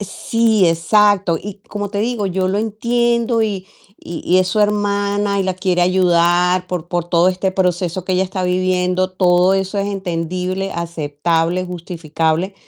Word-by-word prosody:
Sí, 220 0 +1
exacto. 190 +2 +3
Y, 205 0 -7
como 205 0 -4
te 205 - -3
digo, 225 -2 -1
yo 185 0 -1
lo 195 - 0
entiendo 235 +1 0
y 195 -3 -3 0.3
y 170 -2 -7
y 180 +2 +3
es 185 - +2
su 210 +4 0
hermana 205 -1 0
y - - +2
la 185 -1 -1
quiere 185 -1 0
ayudar 180 0 +2
por 175 -2 -4
por 175 -1 -1
todo 175 0 +3
este 185 +1 -1
proceso 180 -1 -1
que 185 - -2
ella 185 +1 +2
está 185 0 -3
viviendo, 185 0 0
todo 180 0 +3
eso 195 +1 -2
es 200 - 0
entendible, 185 0 -3
aceptable, 165 +1 -1
justificable, 170 0 -2
185 Hz, 160 wpm, -18 LUFS, 175-200 Hz, 0.3 s, exacto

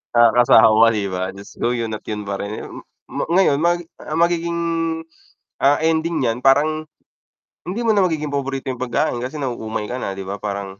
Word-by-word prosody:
nakakasawa, 115 -1 +6
'di 100 -2 -2
ba? 95 0 -3
Diyos 100 +1 -12
ko, 120 - +1
'yon 115 -2 -3
at - - -25
'yon 105 -1 -4
pa 100 -1 -4
rin. 105 +2 -5 0.4
Mo - - -3
ngayon 180 -6 +4
may 175 +2 +2 0.2
ang 155 +2 -4
magiging, 170 0 +1 1.0
ah, 145 +2 +3
ending 160 -1 +1
niyan 115 -1 0
parang 150 +4 +3 0.8
hindi 205 +7 -3
mo 230 - +3
na 205 - +3
magiging 155 -5 0
paborito 135 -1 -2
yung 125 - -7
pagkain 120 -1 0
kasi 125 +5 -5
nauumay 115 -6 -3
ka 125 +4 -5
na, 100 -5 -4
'di 95 - -6
ba? 100 +2 -5
Parang 100 -1 -5
125 Hz, 185 wpm, -20 LUFS, 110-155 Hz, 1.0 s, nakakasawa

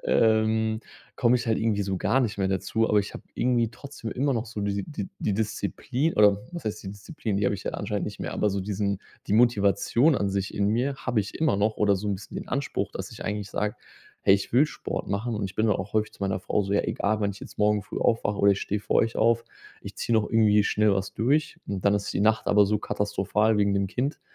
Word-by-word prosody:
Ähm, 110 0 +2 0.4
komme 125 +1 +4
ich 120 0 -4
halt 110 - +2
irgendwie 105 -2 +1
so 95 -1 -2
gar 135 +8 +2
nicht 110 -4 -1
mehr 95 - +1
dazu, 110 +4 0
aber 105 - +4
ich 100 - -7
habe - - -9
irgendwie 120 -2 +2
trotzdem 135 -2 -8
immer 140 +2 0
noch 115 -2 -2
so 110 -2 -6
diese 100 0 -1
die 165 +5 -6
die 100 - -1
Disziplin 115 +7 -1
oder 105 -1 +5
was 170 - -7
heißt 110 - -3
die - - -5
Disziplin? 105 0 -4
Die 100 - 0
habe 100 - +2
ich - - -11
ja - - -2
anscheinend - - -2
nicht - - -7
mehr. - - -4
Aber 105 - +1
so 100 0 -2
diesen 100 0 -1 0.3
die - - -2
Motivation 120 - +3
an 100 -6 0
sich 100 0 -2
in 100 0 +1
mir 125 +6 +1
habe 120 -5 0
ich 100 - -6
immer 155 -10 +1
noch 105 +2 +1
oder 100 -1 +3
so 105 +3 -5
'n 100 - +1
bisschen 95 - -9
den - - -6
Anspruch, 140 +1 -2
dass - - -6
ich - - -9
eigentlich 105 -1 -3
sage: 105 0 -1 0.5
„Hey, 95 - +6
ich 100 - -3
will 140 +5 +5
Sport - - -5
machen.“ 110 +4 -2
Und 105 - -2
ich 95 - -5
bin 110 - +2
dann 105 - +3
auch 100 - -6
häufig 110 0 +1
zu - - -10
meiner 95 -1 0
Frau 105 - 0
so: 100 +1 -3
„Ja, 100 - +3
egal, 110 +1 -1
wann 100 -1 +1
ich 100 - -10
jetzt - - -11
morgen 105 0 +3
früh - - -6
aufwache, 105 -3 +1
oder 100 0 +5
ich 100 - -3
stehe 105 +1 -2
vor - - 0
euch 115 0 +2
auf. 115 +1 +3 0.4
Ich - - -9
ziehe 120 - -1
noch 105 - +1
irgendwie 105 -2 +4
schnell 105 -1 +3
was 95 0 -3
durch.“ 145 +7 +1
Und 100 -1 -4
dann 100 0 +4
ist 100 - -2
die - - -1
Nacht 110 +1 +2
aber 105 -1 +5
so 105 +1 +1
katastrophal 105 +2 0
wegen 100 -1 +3
dem 100 0 +1
Kind, 135 +9 -2
105 Hz, 255 wpm, -26 LUFS, 100-115 Hz, 0.5 s, Hey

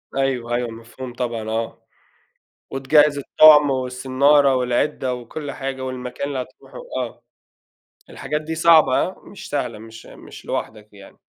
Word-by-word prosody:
أيوه، 130 -3 -1
أيوه، 120 -1 -2
مفهوم 115 +3 -10
طبعًا 115 -3 -4
آه. 115 +1 -4 0.9
وتجهّز 145 +2 +3
الطُعم 150 +1 +6
والصنّارة 130 +2 +2
والعِدّة 125 +1 0
وكل 140 +4 -7
حاجة 135 -1 -5
والمكان 130 +1 -5
اللي 140 - -4
هتروحه - - -14 0.2
آه. - - -5 0.9
الحاجات 150 0 -4
دي 160 +1 -5
صعبة 160 -4 +5
هاه 185 - -4
مش 200 - -11
سهلة، 125 -6 -3
مش 115 +1 -12
مش - - -13
لوحدك 105 -1 -5
يعني. 100 -1 -15
130 Hz, 135 wpm, -21 LUFS, 120-145 Hz, 0.9 s, الطُعم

